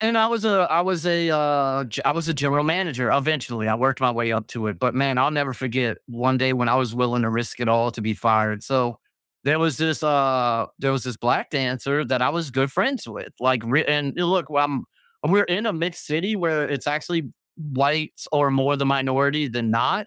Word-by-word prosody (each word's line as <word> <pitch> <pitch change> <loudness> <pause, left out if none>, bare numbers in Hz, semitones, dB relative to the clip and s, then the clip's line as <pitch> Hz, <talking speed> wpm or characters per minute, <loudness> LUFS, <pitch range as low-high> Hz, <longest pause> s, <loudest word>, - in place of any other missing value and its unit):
And 225 +1 +2
I 225 0 +4
was 230 -2 -2
a 195 -5 +3
I 170 - +4
was 180 -2 -2
a, 170 -1 +2
uh, 140 -3 +1
g 115 - -5
I - - +3
was 165 0 -3
a 165 - 0
general 145 +1 +1
manager 155 - 0
eventually. 135 -6 0
I 110 - +2
worked 130 +3 +1
my 125 -2 +3
way 115 -1 -1
up 110 -1 -2
to 110 -3 -4
it. 105 - -5
But, 125 -1 0
man, 135 -1 +1
I'll 145 - +3
never 145 -3 -1
forget 125 -2 -2
one 125 +2 0
day 130 0 +2
when 125 -2 0
I 120 - +4
was 125 -3 -1
willing 125 -1 +1
to 110 - 0
risk 115 +1 -3
it 120 - 0
all 115 +1 +3
to 115 - -8
be 110 0 -2
fired. 110 -1 +1
So, 125 -4 -1 0.5
there 150 +3 +3
was 160 -4 +1
this, 160 0 0
uh, 130 -6 +2
there 135 -1 0
was 130 -2 -2
this 125 -3 -5
black 120 +1 0
dancer 135 +2 -1
that 130 -1 0
I - - +3
was 165 -2 -3
good 135 +1 +1
friends 210 - -1
with. - - -10
Like, 130 -2 +2
re 140 +7 +2
and 145 -1 0
a 175 - +1
look, 180 -2 0
um, 145 -2 0 0.4
we're 205 +2 +4
in 190 +6 -1
a 215 - +1
mixed 170 +1 -4
city, 185 +8 -1
where 160 -5 0
it's 140 -2 -4
actually 155 +3 -1 0.3
whites 150 0 -1
are 145 -2 +3
more 135 +2 +2
the 140 0 -1
minority 140 +2 +1
than 115 -1 -2
not, 190 - +1
135 Hz, 230 wpm, -22 LUFS, 125-155 Hz, 0.5 s, I